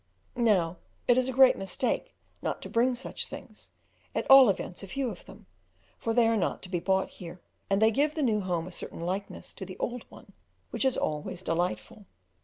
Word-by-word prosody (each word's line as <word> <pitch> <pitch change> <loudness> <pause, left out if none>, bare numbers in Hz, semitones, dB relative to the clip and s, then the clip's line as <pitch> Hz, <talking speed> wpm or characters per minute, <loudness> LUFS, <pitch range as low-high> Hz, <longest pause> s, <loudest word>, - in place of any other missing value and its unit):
Now 190 -8 +2 0.3
it 245 - +6
is 255 +1 +1
a - - 0
great 260 0 +6
mistake 245 - -2 0.3
not - - -2
to - - -7
bring 245 +2 +2
such 255 - -4
things, - - -11 0.5
at - - -1
all 270 -3 +10
events 180 -2 -2
a 195 - -8
few 260 +4 -2
of 180 - -11
them, 195 +2 -14 0.5
for 230 - -1
they 235 0 +4
are 225 - +2
not 200 - -1
to 185 - -7
be 180 -2 -1
bought 190 +2 +1
here, 175 0 -10 0.3
and 195 0 +2
they 220 +1 +5
give 290 +6 +1
the 310 - 0
new 220 -5 +2
home 175 -3 -2
a 185 - -8
certain 170 - -7
likeness 190 +4 -4
to - - -8
the 185 0 -8
old 245 0 -4
one - - -15 0.4
which - - 0
is 265 - +2
always 155 +4 -3
delightful. 180 +4 -2
200 Hz, 210 wpm, -28 LUFS, 180-245 Hz, 0.5 s, all